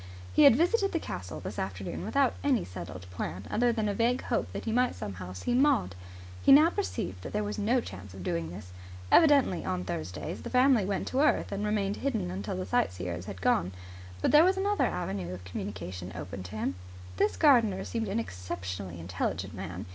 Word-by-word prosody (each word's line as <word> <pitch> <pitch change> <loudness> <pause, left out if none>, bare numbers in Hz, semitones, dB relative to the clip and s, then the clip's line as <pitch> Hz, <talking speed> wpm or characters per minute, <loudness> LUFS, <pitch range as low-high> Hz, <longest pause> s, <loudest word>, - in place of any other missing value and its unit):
He 300 - +6
had 275 - +9
visited 395 - +2
the 330 - +1
castle 90 - -6
this - - -6
afternoon 95 0 -4
without 265 +4 +2
any 270 -6 +2
settled 90 0 -8
plan 90 +1 -5
other 240 +2 +3
than 220 -2 -1
a 205 - 0
vague 235 +4 +1
hope - - -1
that - - -6
he 225 - -1
might 250 +2 +2
somehow 90 -2 -6
see 95 - -2
Maud. 250 - +3 0.5
He - - +5
now 305 +5 +8
perceived 95 - -3
that - - -7
there 210 0 0
was 210 +1 -3
no 235 +5 +2
chance 95 - -9
of 95 - -8
doing 85 -2 -2
this. 90 +1 -9 0.4
Evidently, 280 - +5
on 90 0 -2
Thursdays, 90 - -5
the - - -6
family 255 -4 +4
went 200 0 -2
to 260 - 0
earth 300 - +2
and 200 +1 -2
remained 210 -1 0
hidden 255 - -1
until 100 +3 -4
the 95 - -3
sightseers 90 -1 -1
had 95 -2 -8
gone. 90 +1 +2 0.5
But - - +3
there 300 +2 +8
was 375 +2 +3
another 405 +2 +2
avenue 90 0 -3
of 90 - -11
communication 90 -1 -6
open 95 +1 -6
to 95 +4 -8
him. 110 - -1 0.4
This 210 - +1
gardener 230 - +4
seemed 225 -2 -3
an 195 +3 -1
exceptionally 90 - -5
intelligent 90 +2 -3
man. - - -6
155 Hz, 200 wpm, -29 LUFS, -, 0.5 s, had